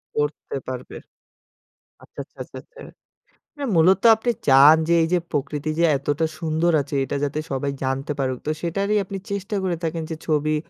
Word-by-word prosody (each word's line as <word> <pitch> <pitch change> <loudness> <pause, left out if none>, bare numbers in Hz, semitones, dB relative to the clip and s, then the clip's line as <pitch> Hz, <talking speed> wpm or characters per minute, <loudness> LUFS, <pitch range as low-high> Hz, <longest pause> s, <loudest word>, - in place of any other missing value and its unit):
পড়তে 150 -1 -2
পারবে। 130 -1 -7 1.0
আচ্ছা, - - -14
আচ্ছা, - - -29
আচ্ছা, - - -12
আচ্ছা। 485 - -16 0.7
মানে 285 -2 -4
মূলত 185 +4 +5
আপনি 240 +2 -1 0.2
চান 140 +3 +8
যে 170 - +3
এই - - +1
যে 180 - +4
প্রকৃতি 150 +1 -2
যে - - +3
এতটা 145 +3 -1
সুন্দর 165 +1 +1
আছে 140 +1 -6
এটা 140 - -4
যাতে 145 +1 -1
সবাই 140 +1 -1
জানতে 135 +2 -2
পারুক। 130 -2 -1
তো 155 - +2
সেটারই 195 +5 -1
আপনি 195 +1 -6
চেষ্টা 200 +1 -3
করে 180 -2 0
থাকেন 165 0 -2
যে 160 - -2
ছবি 155 0 +1
155 Hz, 175 wpm, -23 LUFS, 140-180 Hz, 1.0 s, চান